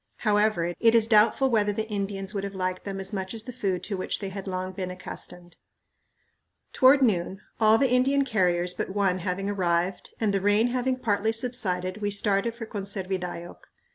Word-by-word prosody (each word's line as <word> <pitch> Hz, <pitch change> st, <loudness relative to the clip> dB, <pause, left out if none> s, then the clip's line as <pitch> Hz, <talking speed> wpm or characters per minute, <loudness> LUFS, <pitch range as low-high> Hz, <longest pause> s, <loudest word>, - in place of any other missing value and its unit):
However, 210 Hz, -5 st, +2 dB
it 230 Hz, 0 st, +4 dB
is 225 Hz, -2 st, +5 dB
doubtful 225 Hz, +4 st, +4 dB
whether 210 Hz, -2 st, +2 dB
the 220 Hz, +2 st, -3 dB
Indians 200 Hz, -1 st, -4 dB
would 200 Hz, -1 st, -3 dB
have 200 Hz, 0 st, -5 dB
liked 185 Hz, 0 st, -3 dB
them 195 Hz, -1 st, -4 dB
as 195 Hz, +2 st, -2 dB
much 190 Hz, +2 st, -4 dB
as 220 Hz, -, -3 dB
the 250 Hz, -, -8 dB
food 195 Hz, -7 st, -2 dB
to 205 Hz, -, -3 dB
which 185 Hz, -, -2 dB
they 195 Hz, -, -5 dB
had 195 Hz, 0 st, -7 dB
long 185 Hz, 0 st, -3 dB
been 185 Hz, -1 st, -5 dB
accustomed. 180 Hz, -1 st, -9 dB, 1.2 s
Toward 270 Hz, +1 st, +6 dB
noon, 190 Hz, -3 st, 0 dB, 0.2 s
all 220 Hz, 0 st, +5 dB
the 265 Hz, 0 st, +2 dB
Indian 270 Hz, +2 st, +3 dB
carriers 180 Hz, -6 st, +1 dB
but -, -, -4 dB
one 190 Hz, -3 st, +1 dB
having 185 Hz, +2 st, -3 dB
arrived, 180 Hz, -2 st, -1 dB
and 215 Hz, -3 st, +1 dB
the 195 Hz, -, 0 dB
rain 205 Hz, +4 st, +3 dB
having 255 Hz, +1 st, 0 dB
partly 220 Hz, -3 st, 0 dB
subsided, 215 Hz, -6 st, -1 dB
we 205 Hz, -, 0 dB
started 205 Hz, +2 st, 0 dB
for 235 Hz, -1 st, -6 dB
Conservidayoc. 190 Hz, -4 st, -4 dB
200 Hz, 185 wpm, -26 LUFS, 185-225 Hz, 1.2 s, Toward